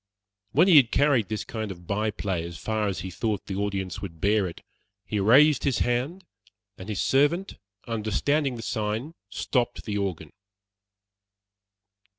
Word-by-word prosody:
When 185 - +4
he 175 -5 +8
had 130 -5 +6
carried 135 -7 +2
this 110 -1 -2
kind 110 -2 -5
of 90 -2 -9
by 105 +4 0
play 90 -3 -3
as 85 0 -7
far 110 -1 -1
as 95 - -3
he 95 - -6
thought 105 +3 -2
the 95 - -5
audience 100 -2 -3
would 85 -5 -8
bear 100 +1 +2
it, 85 - -9 0.4
he 105 - -2
raised 135 +8 +5
his 135 -5 +1
hand, 135 +10 -1 0.5
and 95 +3 -10
his 105 - -3
servant 145 +8 +1 0.3
understanding 120 +6 0
the 115 - -7
sign, 110 +7 -2 0.2
stopped 120 -2 -1
the 105 -2 -2
organ. 85 -6 -4
110 Hz, 160 wpm, -26 LUFS, 100-130 Hz, 0.5 s, he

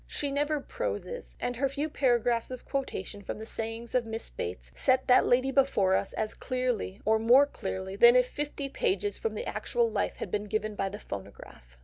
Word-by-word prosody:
She 285 -1 -2
never 295 +2 0
proses, - - -5
and 245 -1 -2
her 275 +1 +1
few 285 +3 -2
paragraphs 240 -5 +1
of 255 -1 -7
quotation 210 -7 -4
from - - -5
the 220 - -7
sayings 225 +1 -4
of 250 -1 +3
Miss 225 0 -4
Bates 65 -9 -6
set 260 - +2
that 250 - +5
lady 255 +2 +3
before 265 -9 +3
us 195 - -1
as 215 0 -2
clearly 250 -6 -2
or 220 +1 +4
more 245 +5 +6
clearly 190 -7 -5
than 235 +4 +7
if 250 0 +5
fifty 290 0 -4
pages 410 - -1
from 450 - -2
the 485 - -4
actual 470 -1 0
life - - -1
had - - -5
been 210 0 -1
given 215 +1 -2
by 195 -1 -2
the 205 - -7
phonograph. 95 - -10
245 Hz, 200 wpm, -29 LUFS, 210-275 Hz, -, than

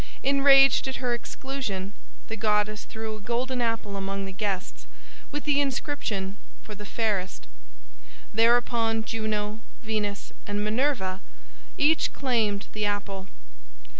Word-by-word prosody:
Enraged 275 -1 +6
at 265 - -2
her 245 -2 0
exclusion, 235 -6 -4 0.3
the 225 - -4
goddess 210 0 +1
threw 220 0 -5
a 215 - -10
golden 245 +3 -1
apple 225 -3 -1
among 195 0 -3
the 195 - -5
guests, 185 - -3 0.4
with 295 0 -4
the 290 -1 +3
inscription, 240 -8 -2 0.3
"For 215 - -8
the 205 0 -9
fairest." 195 - -1 0.9
Thereupon 230 0 +3
Juno, 215 -1 -2 0.2
Venus, 210 -2 -2
and 205 0 -1
Minerva 215 -4 0 0.6
each 310 +2 +3
claimed 225 -7 +1
the 215 - -3
apple. 200 -2 -2
220 Hz, 120 wpm, -27 LUFS, 205-245 Hz, 0.9 s, Enraged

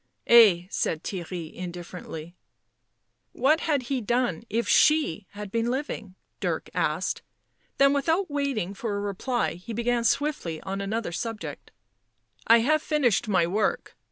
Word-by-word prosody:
" - - -43
Ay," 205 -7 +7
said 160 0 -1
Theirry 175 -3 -5
indifferently. 175 -2 -8 1.0
"What 290 +6 +3
had 290 -6 0
he 255 +1 -2
done 235 -5 0
if 230 +3 -1
she 295 - +3
had 205 -1 -7
been 230 +1 0
living?" 245 -7 -4 0.2
Dirk - - -2
asked, - - -1 0.6
then 275 0 +5
without 320 +7 +1
waiting 270 -10 -1
for 205 +1 -3
a - - -2
reply 205 +4 -1
he 180 +7 -8
began 235 +1 0
swiftly 230 - 0
on 195 +1 -4
another 210 0 -2
subject. 225 +4 -5 0.4
" - - -50 0.3
I 230 0 +7
have 310 +5 +2
finished 275 - +1
my 185 -5 +3
work. 205 +5 -1
225 Hz, 145 wpm, -26 LUFS, 185-265 Hz, 1.0 s, Ay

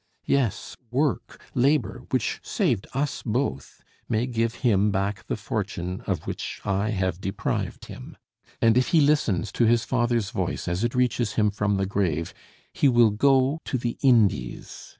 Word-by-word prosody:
Yes, 130 -8 0
work, 135 +2 -1
labor, 135 +1 +1
which - - -1
saved 95 - -1
us 140 +1 -1
both, 110 - -3 0.3
may 115 +2 +1
give 115 -2 -1
him 105 -3 +4
back 100 +1 -2
the - - -2
fortune 90 +2 -4
of 90 -6 -2
which - - -5
I 100 +2 0
have 95 -3 -1
deprived 95 +1 -3
him; - - -10 0.4
and 115 +2 +4
if 125 - +1
he 165 - +4
listens 115 - +2
to 120 - +2
his 115 0 +3
father's 120 -4 0
voice 95 -1 -3
as 90 +4 -1
it 120 +1 -1
reaches 120 -3 +1
him 105 -2 +2
from 105 0 0
the 95 - 0
grave, 90 -5 -1 0.4
he 140 - +3
will 120 -3 +5
go 135 +6 +3
the 120 -2 -1
Indies. 105 - +1
110 Hz, 155 wpm, -25 LUFS, 95-125 Hz, 0.4 s, will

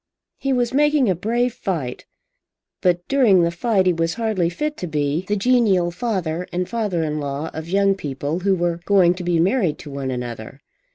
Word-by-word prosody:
He 275 - -1
was 245 -2 +1
making 295 -2 +3
a - - 0
brave 235 +7 0
fight; 160 - -4 0.7
but 175 -1 +1
during 230 -10 +4
the 170 - +1
fight 190 +2 +1
he 180 - +4
was 165 0 -1
hardly 215 -7 0
fit 300 - -3
to 180 - -4
be 150 +2 -1
the 210 - +1
genial 200 -6 +2
father 180 -4 -2
and 180 0 -2
father 210 -8 -1
in 150 -1 -2
law 145 +2 -4
of 160 +1 -6
young 195 +1 +3
people 145 -2 -4
who 190 +1 +2
were 170 -1 -1
going 185 -4 +4
to 180 0 -7
be 175 -1 +1
married 185 - +1
to 145 - -10
one 135 -1 -4
another. 120 +1 -6
180 Hz, 190 wpm, -21 LUFS, 160-220 Hz, 0.7 s, during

